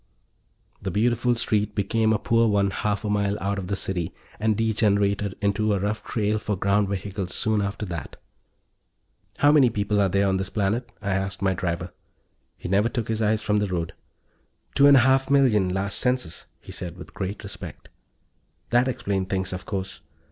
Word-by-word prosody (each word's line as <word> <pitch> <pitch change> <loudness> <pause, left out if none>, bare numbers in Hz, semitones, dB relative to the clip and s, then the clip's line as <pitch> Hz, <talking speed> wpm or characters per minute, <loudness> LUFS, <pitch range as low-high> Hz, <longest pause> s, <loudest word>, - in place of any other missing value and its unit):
The 95 - -3
beautiful 120 +5 +2
street 105 -2 0
became 110 +2 +1
a 110 - +3
poor 115 +2 +2
one 100 -2 +2
half 105 +1 -2
a - - -1
mile 100 0 +1
out 100 +1 -1
of 90 - -5
the 100 - -1
city, 90 -4 -2 0.2
and 110 -1 +1
degenerated 100 -3 +1
into 105 +1 +1
a 100 - +1
rough 105 +2 -2
trail 105 -1 0
for 105 -1 -2
ground 100 +1 +2
vehicles 95 -1 -3
soon 110 -1 +1
after 100 +2 -3
that. 85 -4 -6 1.2
"How 145 - +5
many 140 -5 +6
people 105 -1 0
are 100 - +3
there 100 +2 +2
on 95 -1 +2
this 95 - -3
planet?" 110 +4 -1
I 100 - -1
asked 95 0 -2
my 95 -1 +3
driver. 90 -1 -3 0.6
He - - -7
never 100 +5 +2
took 120 -2 -3
his 110 0 -1
eyes 110 0 +1
from 105 0 +2
the 105 - 0
road. 85 -3 -3 0.8
"Two 140 - +6
and 140 -1 +8
a - - +6
half 130 +2 +3
million, 125 -9 +4
last 95 +2 -1
census," 125 -10 -1
he - - -11
said, 85 -1 -5
with 90 - -11
great 100 +2 -4
respect. 100 - -8 0.8
That 120 +2 +4
explained 100 -6 -2
things, 95 -1 -1
of 90 - -7
course. 95 -2 -4
100 Hz, 185 wpm, -25 LUFS, 95-110 Hz, 1.2 s, and